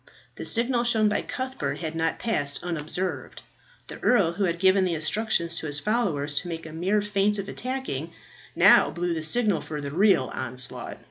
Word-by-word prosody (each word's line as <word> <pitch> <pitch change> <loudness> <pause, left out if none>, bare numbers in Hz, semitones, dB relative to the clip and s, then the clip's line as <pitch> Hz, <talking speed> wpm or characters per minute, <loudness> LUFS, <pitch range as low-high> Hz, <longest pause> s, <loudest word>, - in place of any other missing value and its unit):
The - - -7
signal 235 +1 +2
shown 220 -3 +2
by 210 - 0
Cuthbert 255 - -4
had 160 -2 -3
not 165 0 -1
passed 145 -11 -2
unobserved. 175 +2 -4 0.4
The - - -9
earl, 195 -9 +3
who 195 +3 -1
had 170 -2 -1
given 190 +1 +4
instructions 170 +1 0
to 160 - -5
his 145 0 +1
followers 165 -8 0
to 180 - -10
make 165 -1 -6
a 155 - -9
mere 195 +6 0
feint 205 0 +1
of 200 -1 -5
attacking, 250 - -4 0.4
now - - +6
blew 175 +1 -2
the 160 - -3
signal 205 +3 +2
for 150 -1 -6
the 140 -1 -5
real 185 -5 +3
onslaught. 125 0 -1
175 Hz, 180 wpm, -25 LUFS, 155-210 Hz, 0.4 s, now